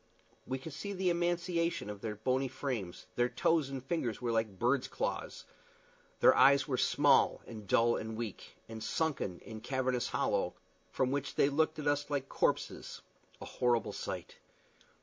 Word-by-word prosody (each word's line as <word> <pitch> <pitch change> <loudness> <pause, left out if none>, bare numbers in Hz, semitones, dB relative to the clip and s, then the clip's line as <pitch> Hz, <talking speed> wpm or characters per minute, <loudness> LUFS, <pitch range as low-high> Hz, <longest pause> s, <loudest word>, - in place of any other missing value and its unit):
We 130 - -1
could 140 +3 -8
see 200 +8 -5
the 185 -2 +1
emaciation 170 - 0
of 105 -1 -7
their 110 -2 -3
bony 130 +5 0
frames; 120 -10 -4
their 120 0 +3
toes 160 -1 +2
and 135 -1 -6
fingers 130 - -1
were 120 -1 -1
like 110 -4 0
birds' 125 +5 +2
claws; - - -4 0.8
their - - +7
eyes 140 0 +6
were 135 - 0
small - - +3
and 105 -3 -9
dull 115 +4 +4
and 110 0 -5
weak, 115 -4 -6
and 110 -1 -7
sunken 140 - -1
in 110 -2 -9
cavernous 130 0 0
hollows, - - 0 0.4
from 130 -1 0
which 140 0 -2
they 140 - +4
looked 155 +2 +1
at 150 - -5
us 145 0 +1
like 140 -2 -2
corpses - - -1 0.4
a - - -7
horrible 120 -2 +1
sight. - - -6
130 Hz, 165 wpm, -33 LUFS, 115-145 Hz, 0.8 s, their